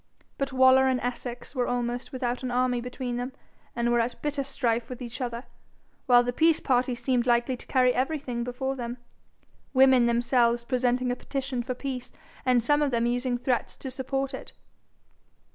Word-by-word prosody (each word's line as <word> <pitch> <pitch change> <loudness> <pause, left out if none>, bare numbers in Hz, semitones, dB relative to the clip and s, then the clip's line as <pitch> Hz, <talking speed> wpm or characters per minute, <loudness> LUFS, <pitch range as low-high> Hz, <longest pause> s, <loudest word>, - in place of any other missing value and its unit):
But 275 -1 -1
Waller 260 0 +6
and 260 -1 +2
Essex 245 0 -5
were 250 -3 0
almost 245 +1 -2
without 250 -2 -2
an 255 - -3
army 250 0 +1
between 245 0 -4
them, 250 +2 -4 0.4
and 240 0 +1
were 240 - +3
at 235 +1 -1
bitter 290 -1 -1
strife 240 -3 -1
with 250 -1 -7
each 240 +1 -7
other, 240 -1 -3 0.6
while 245 -1 +6
the 245 0 -2
peace 325 +3 +4
party 250 -1 +1
seemed 250 0 0
likely 240 +2 +2
to - - -12
carry 255 -1 +3
everything 260 -3 -2
before 255 +2 -3
them, 240 -1 -5 0.8
women 260 -2 +6
themselves 235 0 +2
presenting 250 0 0
a - - -1
petition 265 -1 -3
for 250 +1 -4
peace, 255 -1 -5 0.4
and 245 -2 +4
some 295 +4 +3
of 295 - +2
them 235 -2 +1
using 245 +1 0
threats 250 0 -1
to 265 - -6
support 270 +1 -3
it. 265 - -8
250 Hz, 180 wpm, -27 LUFS, 240-265 Hz, 0.8 s, Waller